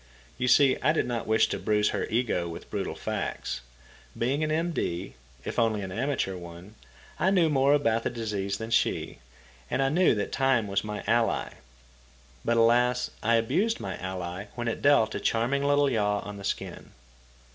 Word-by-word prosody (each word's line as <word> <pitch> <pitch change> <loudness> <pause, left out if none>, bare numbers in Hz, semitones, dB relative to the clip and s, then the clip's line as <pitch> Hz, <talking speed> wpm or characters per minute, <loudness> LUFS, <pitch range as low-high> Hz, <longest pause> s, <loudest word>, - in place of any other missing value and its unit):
You 125 - 0
see, 130 +1 +5
I 155 +4 +3
did 160 - +1
not 120 -2 -3
wish 110 0 +4
to - - -3
bruise 105 -1 +2
her - - -2
ego 110 -7 0
with 85 - -9
brutal - - -3
facts. - - -4 0.6
Being 135 +6 0
an 155 - -1
M.D., 155 - -2 0.3
if - - -2
only 110 -3 +1
an 95 - -6
amateur 130 -4 -1
one, 85 +3 -10 0.5
I 190 - +3
knew 180 -4 +3
more 140 0 +4
about 115 -6 +1
the - - -1
disease 105 -4 -3
than 110 +2 -6
she, 115 - 0 0.5
and - - -1
I 135 0 +2
knew 175 -2 +3
that 105 - -3
time 135 -4 +2
was 100 0 0
my 105 -1 -5
ally. 115 -1 +1 0.9
But 115 - +1
alas, 120 +2 +3
I 115 +2 +3
abused 195 - +1
my - - -4
ally 90 +1 -5
when 120 -1 -3
it 115 - -2
dealt 140 -6 +4
a - - -3
charming 125 +5 0
little 145 0 +3
yaw 105 -5 +1
on 105 0 -8
the 100 - -9
shin. - - -5
115 Hz, 180 wpm, -27 LUFS, 105-135 Hz, 0.9 s, see